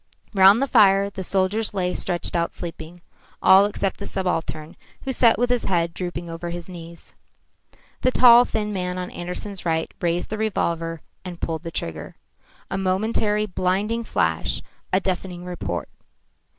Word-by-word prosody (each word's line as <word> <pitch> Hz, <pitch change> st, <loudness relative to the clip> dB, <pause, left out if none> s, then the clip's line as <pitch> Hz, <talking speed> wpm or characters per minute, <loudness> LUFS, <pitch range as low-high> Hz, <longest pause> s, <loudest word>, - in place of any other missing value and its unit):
Round 195 Hz, +2 st, +7 dB
the -, -, 0 dB
fire 200 Hz, -4 st, +5 dB
the 190 Hz, -, -6 dB
soldiers 195 Hz, +4 st, +1 dB
lay 180 Hz, -2 st, 0 dB
stretched 175 Hz, 0 st, 0 dB
out 170 Hz, 0 st, -1 dB
sleeping, 170 Hz, 0 st, -8 dB, 0.4 s
all 195 Hz, +2 st, +6 dB
except 200 Hz, -2 st, -2 dB
the 200 Hz, -, -5 dB
subaltern, 165 Hz, -4 st, -3 dB, 0.3 s
who 265 Hz, -, -2 dB
sat 235 Hz, -2 st, +4 dB
with 245 Hz, +1 st, +1 dB
his 245 Hz, -2 st, +1 dB
head 170 Hz, -2 st, 0 dB
drooping 175 Hz, -1 st, -5 dB
over 165 Hz, +1 st, -6 dB
his 175 Hz, 0 st, -6 dB
knees. 170 Hz, -2 st, -10 dB, 0.9 s
The 255 Hz, -, +3 dB
tall 245 Hz, -1 st, +8 dB
thin 210 Hz, -3 st, -3 dB
man 180 Hz, -1 st, -2 dB
on 180 Hz, 0 st, -5 dB
Andersen's 180 Hz, +3 st, -6 dB
right 160 Hz, -1 st, -1 dB
raised 175 Hz, +1 st, -1 dB
the 215 Hz, -, -3 dB
revolver 165 Hz, -6 st, -1 dB, 0.2 s
and 175 Hz, -2 st, -8 dB
pulled 160 Hz, -2 st, -3 dB
the 165 Hz, -, -6 dB
trigger. 80 Hz, -, -6 dB, 0.6 s
A 195 Hz, -, -1 dB
momentary 210 Hz, +2 st, +1 dB
blinding 205 Hz, +4 st, -1 dB
flash, -, -, 0 dB, 0.3 s
a 185 Hz, -, +3 dB
deafening 180 Hz, -2 st, -4 dB
report. 125 Hz, -, -4 dB
185 Hz, 155 wpm, -23 LUFS, 170-205 Hz, 0.9 s, tall